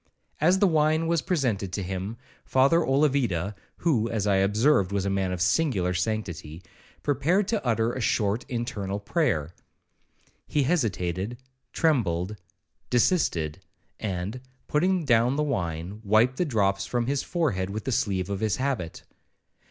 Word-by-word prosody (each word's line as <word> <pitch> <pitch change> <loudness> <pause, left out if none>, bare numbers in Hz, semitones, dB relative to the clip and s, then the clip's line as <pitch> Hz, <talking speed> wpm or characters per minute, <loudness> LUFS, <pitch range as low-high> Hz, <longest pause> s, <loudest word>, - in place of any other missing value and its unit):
As 175 +5 +4
the 200 - +4
wine 155 -2 +3
was 165 -1 +1
presented 115 - -1
to 100 - -2
him, 95 +4 -4 0.3
Father 135 +6 +4
Olavida, 130 - +1 0.2
(who, 120 -9 +1
as 110 -3 -1
I 100 -2 +3
observed, 100 +1 +3
was 100 -1 -1
a 100 - 0
man 95 -1 0
of 90 -1 -1
singular 95 - +1
sanctity), 90 -4 -3 0.4
prepared 155 +8 +1
to 220 -3 0
utter 115 -1 +1
a 130 - -4
short 105 +1 +1
internal 105 -5 -3
prayer. 100 - 0 0.9
He 145 - +1
hesitated,—trembled,—desisted; 105 - -1 0.4
and, 100 +4 -3 0.3
putting 180 +2 +1
down 120 0 +3
the 150 - +1
wine, 90 - -3
wiped 110 +5 +3
the 180 - +1
drops 100 -7 +1
from 120 -1 0
his 140 +2 0
forehead 115 - -1
with 105 +2 -4
the 135 - -2
sleeve 100 -6 0
of 100 - -2
his 110 -1 +1
habit. 130 -11 -3
110 Hz, 135 wpm, -26 LUFS, 95-140 Hz, 0.9 s, As